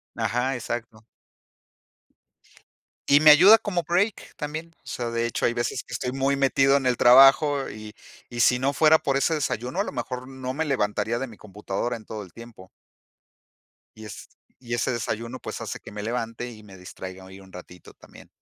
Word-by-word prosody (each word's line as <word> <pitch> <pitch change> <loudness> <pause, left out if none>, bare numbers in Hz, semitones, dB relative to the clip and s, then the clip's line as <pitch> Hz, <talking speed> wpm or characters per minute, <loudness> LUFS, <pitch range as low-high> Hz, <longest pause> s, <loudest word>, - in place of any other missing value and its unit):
Ajá, 125 +2 -1
exacto. 115 -2 -6 2.0
Y 145 +1 +6
me 155 -1 +8
ayuda 190 +9 +8
como 185 -6 -3
break 190 +5 -1
también. 155 +2 -6
O - - -27
sea, 120 -1 -4
de 115 0 -1
hecho, 115 - -2
hay 120 - +1
veces 120 0 -3
que - - -12
estoy 125 -1 -3
muy 135 +1 0
metido 135 0 +3
en 135 - -3
el 125 -1 +1
trabajo 135 +3 +6
y 110 0 -10 0.4
y 120 -1 -7
si 125 +1 +4
no 140 +2 0
fuera 160 +1 +5
por 135 -1 0
ese 160 +4 +1
desayuno, 135 - -3
a - - 0
lo - - -6
mejor 125 0 -5
no 130 -1 -6
me 160 +3 -2
levantaría 115 -3 -1
de 135 - -4
mi 110 - -13
computadora 105 +3 -5
en 110 - -16
todo 105 -2 -7
el 90 - -15
tiempo. 115 -6 -13 1.3
Y 110 - -11
es 105 - -10 0.4
y 120 0 -3
ese 125 - -1
desayuno, 115 +1 -4
pues, - - -7
hace - - -6
que - - -12
me 105 0 -7
levante 115 +1 -4
y 110 -1 -13
me 100 -3 -14
distraiga 95 +1 -10
ahí 95 +1 -13
un 95 -1 -16
ratito 90 -1 -13
también. - - -17
120 Hz, 190 wpm, -24 LUFS, 110-140 Hz, 2.0 s, me